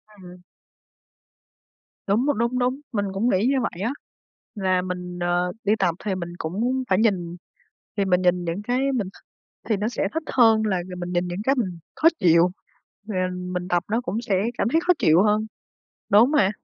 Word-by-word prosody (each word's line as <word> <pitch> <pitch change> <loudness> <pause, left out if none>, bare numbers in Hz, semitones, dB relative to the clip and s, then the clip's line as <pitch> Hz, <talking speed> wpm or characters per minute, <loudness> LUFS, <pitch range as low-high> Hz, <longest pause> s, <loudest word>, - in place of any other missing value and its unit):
Ừm. 180 -2 -13 1.7
Đúng, 215 +6 +2
m - - +1
đúng, 235 +2 0
đúng, 255 +2 0
mình 205 -4 -1
cũng 210 +5 +1
nghĩ 200 0 +2
như 275 - +2
vậy 190 -5 -4
á, 230 - 0 0.6
là 185 -3 +1
mình, 180 -1 -5
ờ, 175 +1 0
đi 205 - +3
tập 175 -3 +1
thì 200 -3 0
mình 175 -2 -5
cũng 235 +11 -1
phải 190 0 +3
nhìn, 180 -6 0 0.6
thì 200 - +1
mình 180 -1 +2
nhìn 180 0 +2
những 170 +5 -3
cái 255 +5 0
mình 225 -8 -1
th - - -18 0.5
thì 215 - +2
nó 210 +2 -1
sẽ 235 - -1
thích 320 0 -2
hơn 225 -3 +5
là 200 -3 +1
g 180 - -8
mình 175 0 -5
nhìn 175 0 0
những 175 +3 -4
cái 270 +3 +2
mình 185 -9 -2 0.2
khó 320 - +4
chịu, 170 +1 +4 0.6
rồi, 190 -4 -2
à, 185 - +1
mình 180 0 -4
tập 175 -1 +1
nó 230 +2 +1
cũng 235 -2 -3
sẽ 200 -5 0 0.2
cảm - - +1
thấy 325 - +3
khó 360 - +7
chịu 165 +5 +5
hơn, 215 +1 +2 0.7
đúng 220 +7 +6
mà. 205 -11 +3
195 Hz, 200 wpm, -23 LUFS, 180-230 Hz, 1.7 s, khó